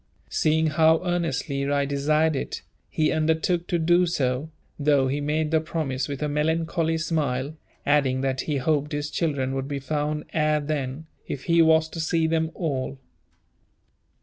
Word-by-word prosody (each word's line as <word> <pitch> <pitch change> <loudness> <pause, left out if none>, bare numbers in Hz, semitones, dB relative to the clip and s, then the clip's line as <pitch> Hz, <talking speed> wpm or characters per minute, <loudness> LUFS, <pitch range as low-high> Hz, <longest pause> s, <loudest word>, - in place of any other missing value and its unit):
Seeing 160 +1 +2
how 160 +1 +4
earnestly 140 -5 -1
I 140 -1 +2
desired 150 +3 +1
it, 135 - -4 0.3
he 155 -1 +1
undertook 160 +2 +1
to 175 - +1
do 175 +2 +3
so, 135 -2 -1 0.3
though 140 -2 +3
he 140 +2 -1
made 150 +1 0
the 160 -1 +3
promise 150 -5 -2
with 140 0 -4
a - - +1
melancholy 160 +2 0
smile, 150 -3 -1 0.3
adding 140 -3 +2
that 130 -1 0
he 150 -2 -2
hoped 150 +2 0
his 145 0 -3
children 140 -6 -1
would 135 0 -3
be 140 -1 -3
found 150 +2 -2
ere 155 -1 +2
then, 145 0 -3 0.2
if 135 - -5
he 170 -1 +4
was 160 0 +5
to 165 - -7
see 165 0 +1
them 160 0 +1
at 160 - -14
all. 135 -5 -2
150 Hz, 165 wpm, -25 LUFS, 140-160 Hz, 0.3 s, was